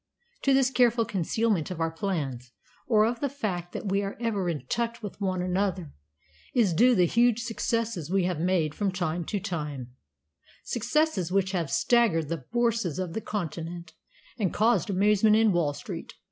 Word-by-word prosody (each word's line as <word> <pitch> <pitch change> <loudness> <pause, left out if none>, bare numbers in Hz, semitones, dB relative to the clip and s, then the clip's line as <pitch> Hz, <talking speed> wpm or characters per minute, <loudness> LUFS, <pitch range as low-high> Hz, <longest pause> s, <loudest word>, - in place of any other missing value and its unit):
To 275 - +3
this 265 -1 +3
careful 240 -3 +3
concealment 200 -1 0
of 180 -3 -6
our 165 0 0
plans, 145 -9 -3 0.3
or 215 -3 +4
of 235 +1 -1
the 280 - -1
fact 190 -10 -4
that 200 - -4
we 195 +1 +1
are 200 0 -4
ever 210 -6 -1
in 150 -6 -4
touch 235 - -2
with 205 0 -7
one 185 -2 0
another, 185 -3 -1 0.6
is 220 -8 +3
due 245 +9 +5
the 180 - +4
huge 235 +4 +3
successes 230 - -2
we 190 0 +2
have 175 -3 -1
made 170 -3 +1
from 200 +1 -1
time 175 -2 -2
to 205 - -2
time 150 - -5 0.7
successes 240 - 0
which 190 0 +1
have 170 -6 -1
staggered 170 - +2
the 165 -6 -4
Bourses 230 -8 0
of 185 -3 -3
the 220 - -3
Continent 170 -4 -5 0.5
and 195 -5 +1
caused 220 -2 +2
amazement 210 +2 +4
in 220 -1 +4
Wall 170 -5 +1
Street. - - -7
195 Hz, 175 wpm, -27 LUFS, 170-230 Hz, 0.7 s, due